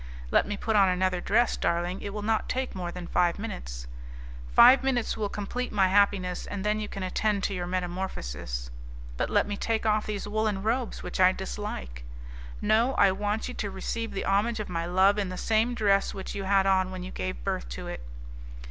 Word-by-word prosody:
"Let - - +3
me 205 0 -3
put 220 +1 -1
on 195 -2 +6
another 180 0 +1
dress, 235 +6 +2
darling, 175 +2 -1
it 200 - -5
will 210 0 -5
not 220 0 0
take 260 0 -2
more 180 -2 -4
than 180 0 -7
five 175 0 +1
minutes." - - -6 0.7
"Five 260 - +8
minutes 255 -3 0
will 210 -2 -2
complete 225 +6 -4
my 195 -3 +3
happiness, 195 -2 +2
and 200 0 -5
then 210 0 +1
you 210 - -3
can 195 - -5
attend 200 +2 0
to - - 0
your 175 -2 -3
metamorphosis." 175 - -4 0.4
"But - - -1
let - - +3
me 205 0 -4
take 225 +1 -1
off 215 0 +2
these 210 -1 -3
woollen 210 -2 -1
robes, 235 +2 -1
which - - -5
I 185 0 +7
dislike." 65 - -6 0.6
"No; 235 +5 +3
I 200 -1 +5
want 205 +3 -2
you 250 - -5
to 205 - -3
receive 225 +4 -4
the 195 - -3
homage 215 +4 +1
of 210 - -4
my 170 -1 -2
love 190 +3 +4
in 195 -2 -1
the 185 - -6
same 225 +4 +1
dress 200 -3 +2
which 190 - -6
you 195 -1 -4
had 195 0 +3
on 190 -1 +3
when 185 -1 -6
you 185 - -7
gave 95 -10 -4
birth - - -2
to - - -6
it." 65 - -6
195 Hz, 210 wpm, -28 LUFS, 180-215 Hz, 0.7 s, Five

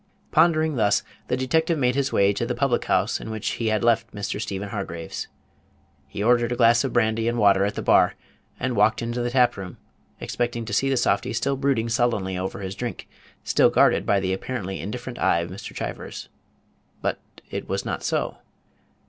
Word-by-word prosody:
Pondering 160 -2 +3
thus, 105 -3 +3 0.2
the 125 - 0
detective 160 +5 +1
made 125 -3 +2
his 140 +1 0
way 100 0 +3
to 100 - -2
the 120 +1 -2
public 135 -4 +1
house - - +1
in - - -7
which 110 -1 -4
he 115 - 0
had 110 0 +1
left 115 -2 +2
Mr. 100 0 -3
Stephen 100 -1 -4
Hargraves. 90 -6 -5 0.8
He 100 +8 -4
ordered 120 +1 +3
a - - 0
glass 115 -1 +5
of 135 - -2
brandy 115 -1 +1
and 120 0 0
water 100 -3 +4
at 100 - -2
the - - -4
bar, - - +4 0.4
and 130 -2 -1
walked 110 +1 +3
into 120 +1 -2
the 120 - -1
tap 125 -2 +3
room, 95 -3 -7 0.4
expecting 120 -1 -2
to 105 - -6
see 135 +6 +2
the 135 - +1
softy 120 - +1
still 135 +4 0
brooding 135 -4 0
sullenly 115 -5 0
over 95 +2 -4
his 95 -1 -4
drink, 120 +3 -5 0.4
still - - +4
guarded - - +3
by 100 - +3
the 95 -1 -1
apparently 95 -2 -4
indifferent 120 +4 -6
eye 85 - +3
of 85 +1 -6
Mr. 95 - -8
Chivers. - - -6 0.7
But - - -1 0.3
it - - -5
was - - -2
not - - -3
so. - - -1
115 Hz, 195 wpm, -24 LUFS, 100-125 Hz, 0.8 s, glass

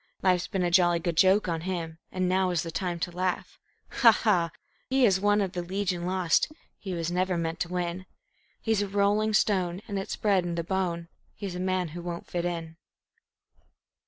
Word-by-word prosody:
Life's 180 -2 +3
been 190 -3 -1
a 175 - +1
jolly 175 -1 +5
good 170 0 -2
joke 190 +4 +4
on 165 -2 -1
him, 165 -2 -4
And 185 -1 0
now 185 0 +2
is 175 -3 0
the 165 - -5
time 175 -1 -2
to 175 - -1
laugh. 180 +1 -3 0.4
Ha, 235 -3 +10
ha! 185 -6 +2 0.4
He 265 -1 +4
is 190 -4 +4
one 205 0 +3
of 190 -2 -1
the 180 - -3
Legion 180 -1 -2
Lost; 185 - +2 0.3
He 190 -3 -4
was 170 0 -2
never 180 0 0
meant 165 0 -2
to 175 - -2
win; 180 +1 -3 0.5
He's 220 -2 +1
a 205 - -1
rolling 205 +2 +2
stone, 185 -5 +1
and 200 -3 -2
it's 195 - -4
bred 200 -4 +2
in 175 -1 -3
the 170 - -2
bone; 170 -2 -2 0.3
He's 195 -3 -5
a 180 - -5
man 185 -2 0
who 175 +3 -7
won't 170 0 -5
fit 175 -1 -3
in. 165 -2 -4
180 Hz, 200 wpm, -28 LUFS, 170-195 Hz, 0.5 s, Ha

